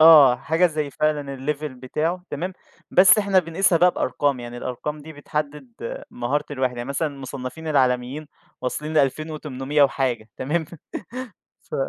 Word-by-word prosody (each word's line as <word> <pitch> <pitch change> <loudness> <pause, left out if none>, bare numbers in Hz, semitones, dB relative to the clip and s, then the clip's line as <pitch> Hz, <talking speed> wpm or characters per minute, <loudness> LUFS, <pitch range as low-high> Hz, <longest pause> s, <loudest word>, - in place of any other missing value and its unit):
آه، 150 -6 +9
حاجة 160 +7 +2
زي 150 -3 -2
فعلًا 145 -2 -1
الlevel 150 +3 -2
بتاعه 155 +8 -2
تمام، 180 +6 -3 0.4
بس 190 +3 +7
إحنا 200 -2 +3
بنقيسها 170 +1 +2
بقى 180 +2 +6
بأرقام، 145 -6 0
يعني 120 0 -7
الأرقام 130 +5 -4
دي 160 +2 -10
بتحدّد 155 - -5
مهارة 140 +5 -1
الواحد، 130 -3 -1
يعني 120 +2 -5
مثلًا 145 +3 0
المصنَّفين 135 +2 -7
العالميين 130 +1 +1 0.3
واصلين 150 +5 -3
ل2800 150 -1 +1
وحاجة 130 -5 +1
تمام، 160 +5 -1 1.1
ف - - -4
150 Hz, 135 wpm, -23 LUFS, 130-160 Hz, 1.1 s, آه